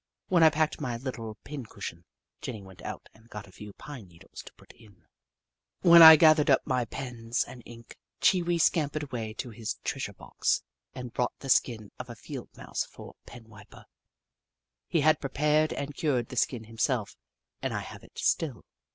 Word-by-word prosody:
When 175 -2 +4
I 160 - +8
packed 155 0 -1
my 125 -5 -2
little 115 -4 -6
pin 145 -2 -7
cushion, 85 -5 -8 0.4
Jenny 110 -5 -6
went 95 -1 -14
out - - -7
and 115 +1 -22
got 105 -2 -8
a 95 - -17
few 105 +2 -10
pine 130 -6 -10
needles 85 -1 -13
to - - -12
put - - -18
in; 105 -6 -21 0.8
when 170 -1 +8
I 160 -1 +13
gathered 155 -1 +5
up 135 - +4
my 125 -2 0
pens 120 -1 -3
and 125 - -11
ink, 115 -1 -13 0.2
Chee 185 -2 +4
Wee 170 0 0
scampered 155 -2 +1
away 115 -6 -5
to 125 -1 -6
his 110 0 -4
treasure - - -3
box - - -1 0.3
and 125 -2 -7
brought 125 - -1
the 135 - -9
skin 110 -5 +1
of 125 0 -7
a 120 - -7
Field - - -8
Mouse - - -3
for - - -12
a - - -19
penwiper. 110 -3 -14 1.0
He 165 - +1
had 155 +2 +3
prepared 150 +3 +1
and 140 +1 -4
cured 130 -7 0
the - - -8
skin 120 -1 0
himself, 115 0 -2 0.5
and - - -2
I - - -2
have - - -10
it - - -18
still. 145 -8 -1
125 Hz, 185 wpm, -28 LUFS, 110-150 Hz, 1.0 s, I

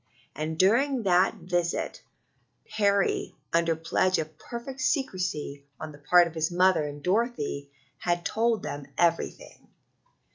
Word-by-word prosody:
And 155 +2 -3
during 240 - +3
that 185 +1 +3
visit 175 -3 -2 0.7
Harry, 200 -2 +1 0.2
under 165 0 +3
pledge 165 +3 +1
of 155 0 -4
perfect 260 +4 -7
secrecy 185 - -1 0.2
on 155 - -6
the 145 - -14
part 175 +4 +5
of 165 - -6
his 160 -1 0
mother 175 -3 +3
and 145 0 -8
Dorothy, 180 - -1 0.3
had 175 -1 -1
told 225 -1 +1
them 145 -1 -5
everything. 170 -1 -1
175 Hz, 130 wpm, -27 LUFS, 155-205 Hz, 0.7 s, part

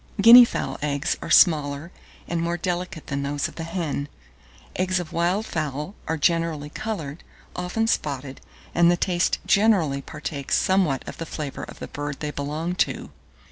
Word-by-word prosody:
Guinea 235 +4 +10
fowl - - -4
eggs 145 0 0
are - - -6
smaller 150 -1 +4 0.4
and 170 -1 -1
more 170 +1 -1
delicate 175 -2 -3
than 140 -1 -3
those 140 +1 -1
of - - -12
the 165 - -6
hen. 160 -4 -3 0.7
Eggs 185 0 +1
of 175 -3 -7
wild 180 +6 +1
fowl 150 +1 -3
are 160 - -1
generally 160 -2 0
coloured, 170 -9 -5 0.3
often 180 +5 -1
spotted; 140 - -2 0.3
and 170 0 +5
the 175 - +3
taste 175 -1 +1
generally 190 -10 +3
partakes 140 -1 -3
somewhat 185 -8 +1
of - - -8
the 165 - -4
flavour 150 -4 -5
of - - -12
the - - -7
bird 145 -1 -5
they 150 -1 -3
belong 150 +5 -3
to. 180 - -1
165 Hz, 165 wpm, -24 LUFS, 145-180 Hz, 0.7 s, Guinea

